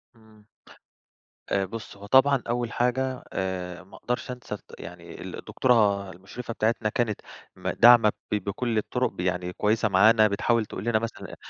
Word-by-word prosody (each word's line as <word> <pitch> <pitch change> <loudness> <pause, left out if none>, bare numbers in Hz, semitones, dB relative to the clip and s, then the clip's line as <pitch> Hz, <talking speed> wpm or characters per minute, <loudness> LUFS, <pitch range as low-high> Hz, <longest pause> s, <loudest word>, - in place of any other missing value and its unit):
إمم. 110 -2 -21 1.0
آآ 100 -1 +1
بُصّي 110 +1 -8
هو 100 - -10
طبعًا 135 +3 +4
أول 120 -1 -1
حاجة 130 +1 -1
آآ 90 -1 -4
ما 95 - -16
أقدَرش 125 +1 -3
أنسى 125 -4 -7
الد - - -13 0.2
يعني - - -10
ال - - -7
الدكتورة 100 -6 +2
المُشرِفة 100 +7 -8
بتاعتنا 110 0 0
كانت 110 -1 -1 0.3
ما - - -3
داعمة 120 -3 +7 0.2
ب - - +2
بكلّ 110 +3 -2
الطرُق، 125 +4 0
ب - - -18
يعني 90 0 -1
كويسة 110 +1 +1
معانا 110 +3 +6
بتحاول 110 +3 +1
تقول 100 - -7
لنا 115 -2 +2
مثلًا 115 0 -6
أ - - -7
110 Hz, 165 wpm, -26 LUFS, 100-120 Hz, 1.0 s, داعمة